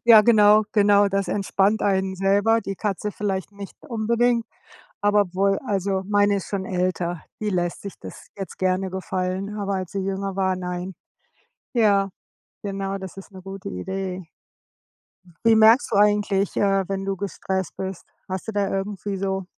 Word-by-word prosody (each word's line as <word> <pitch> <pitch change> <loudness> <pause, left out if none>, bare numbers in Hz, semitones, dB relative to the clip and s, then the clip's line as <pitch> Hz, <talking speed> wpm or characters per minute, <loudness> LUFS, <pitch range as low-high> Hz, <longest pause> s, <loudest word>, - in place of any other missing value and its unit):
Ja, 225 -2 +9
genau, 210 -1 +6
genau, 205 -1 +5
das 195 0 -1
entspannt 200 +1 +1
einen 190 -1 +1
selber, 200 +4 +3
die 195 -2 -5
Katze 210 0 -2
vielleicht 200 -1 -3
nicht 200 -1 -9
unbedingt, 235 +1 +1 0.5
aber 205 0 +4
obwohl 195 +1 +1
also 195 -2 0
meine 205 0 +3
ist 195 - -5
schon 195 -2 -2
älter, 180 -2 -1 0.2
die 210 - -1
lässt 175 -2 -1
sich 200 - -7
das - - -11
jetzt 195 -2 -7
gerne 185 0 0
gefallen, 190 +2 -3
aber 200 -1 -1
als 185 -2 -4
sie 200 - -3
jünger 195 0 -3
war, 190 -1 +1
nein. 180 0 -5 0.8
Ja, 200 -4 +3 0.5
genau, 195 -1 -3
das 190 -1 -8
ist 195 - -11
'ne 190 -1 -11
gute 195 0 -7
Idee. 185 - -4 1.2
Wie 225 -1 +6
merkst 220 +4 +6
du 200 - +2
eigentlich, 205 -1 +2
äh, 195 -1 +3
wenn 195 0 -3
du 195 0 -1
gestresst 190 -1 -3
bist, 190 -1 -5 0.2
hast 190 +2 -5
du 220 - -2
da 200 -2 0
irgendwie 195 0 -3
so 190 0 -2
195 Hz, 160 wpm, -23 LUFS, 190-205 Hz, 1.2 s, Ja